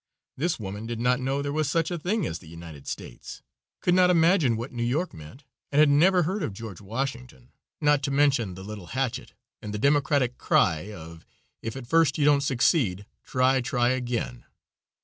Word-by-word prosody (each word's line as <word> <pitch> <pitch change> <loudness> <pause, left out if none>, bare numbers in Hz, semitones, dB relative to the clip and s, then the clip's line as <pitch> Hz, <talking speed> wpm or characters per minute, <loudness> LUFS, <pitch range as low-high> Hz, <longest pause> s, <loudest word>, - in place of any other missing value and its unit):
This 160 +2 -1
woman 105 +2 -6
did 115 -1 -4
not 125 +2 +2
know 135 +2 -1
there 145 0 -3
was 155 -1 0
such 165 +3 0
a 175 - -2
thing 195 +4 -1
as 80 - -4
the - - -16
United 80 -4 -11
States, - - -8 0.4
could 175 - +2
not 180 0 +5
imagine 165 - +4
what 120 +4 -5
New 120 - -5
York 140 +10 -1
meant, 80 - -12 0.3
and 140 - -1
had 155 -1 +6
never 175 +5 +4
heard 190 +6 -2
of 135 - -3
George 105 -3 -8
Washington, 125 +3 -5 0.3
not 145 -2 +3
to 140 - -2
mention 135 -9 +2
the 95 - -9
little 105 -3 -8
hatchet 130 -3 -2 0.3
and 105 -1 -5
the - - -1
democratic 140 0 +2
cry 80 +6 +2
of 80 -4 -10 0.4
"If 115 0 -5
at 135 -2 -7
first 160 +1 +3
you 145 - +2
don't 145 -1 +5
succeed, 120 - +1 0.2
try, 130 +1 +2
try 120 0 +1
again." 120 - -3
130 Hz, 190 wpm, -26 LUFS, 105-150 Hz, 0.4 s, had